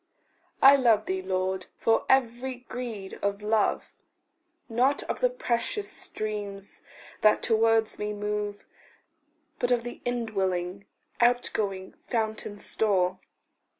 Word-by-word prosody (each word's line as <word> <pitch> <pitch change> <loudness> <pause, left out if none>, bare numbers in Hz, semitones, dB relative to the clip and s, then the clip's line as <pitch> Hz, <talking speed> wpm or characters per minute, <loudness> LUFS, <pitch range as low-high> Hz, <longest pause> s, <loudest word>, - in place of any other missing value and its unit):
I 275 +1 +9
love 225 -5 +4
thee, 190 0 -1
Lord, 185 0 -2
for 225 0 +2
very 250 0 +1
greed 225 -5 -6
of 200 +1 -1
love 215 0 +1 0.7
Not 255 +5 +2
of - - -4
the - - +3
precious 405 - -2
streams 205 -2 -5 0.4
that 215 - +4
towards 225 -1 +2
me 210 0 -2
move, 210 0 -3 0.9
But 245 - +1
of 245 -2 +2
the 240 - -7
indwelling, 200 -6 -2 0.3
outgoing, 215 -6 +1
fountain 220 -2 -3
store. 190 -4 +1
215 Hz, 110 wpm, -27 LUFS, 200-240 Hz, 0.9 s, I